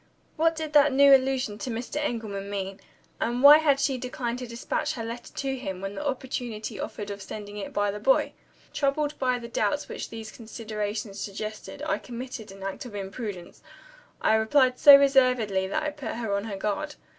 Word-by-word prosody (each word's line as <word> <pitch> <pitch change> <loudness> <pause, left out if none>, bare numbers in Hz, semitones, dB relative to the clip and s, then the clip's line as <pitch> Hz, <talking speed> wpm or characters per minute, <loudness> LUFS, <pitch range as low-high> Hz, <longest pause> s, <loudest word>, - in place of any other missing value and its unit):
What 325 0 +2
did 315 -1 -5
that 295 -1 +6
new 280 +1 +7
allusion 260 -5 0
to 255 - -4
Mr. 235 +5 -4
Engelman 220 -8 -3
mean? 195 -1 -4 0.4
And 240 +3 -1
why 295 +2 +10
had 285 -3 +3
she 270 -2 0
declined 245 -1 -3
to 250 - -6
despatch 235 +6 -2
her 230 -5 -5
letter 235 +1 -7
to 270 -1 -3
him, 195 -8 -5
when 195 +1 -5
the 295 - -5
opportunity 250 -5 -4
offered 205 -1 -5
of 200 0 -7
sending 205 +1 -8
it 200 - -5
by 205 0 0
the 210 - -6
boy? 265 +6 +2 0.4
Troubled 290 +1 0
by 255 -2 +1
the 235 -1 -7
doubts 290 +4 -1
which - - -6
these 225 -1 -8
considerations 215 -2 -5
suggested, 215 +6 -6
I 310 - 0
committed 240 -3 -7
an 195 0 -11
act 195 0 -4
of 230 -4 -9
imprudence 195 -2 -6 0.6
I - - +4
replied 250 +4 +3
so 285 -1 +11
reservedly 255 -8 +3
that 195 - -1
I 300 - -1
put 290 -6 -6
her 225 -3 -2
on 200 +1 -2
her 205 -3 -5
guard. 215 +10 -2
235 Hz, 190 wpm, -27 LUFS, 205-270 Hz, 0.6 s, so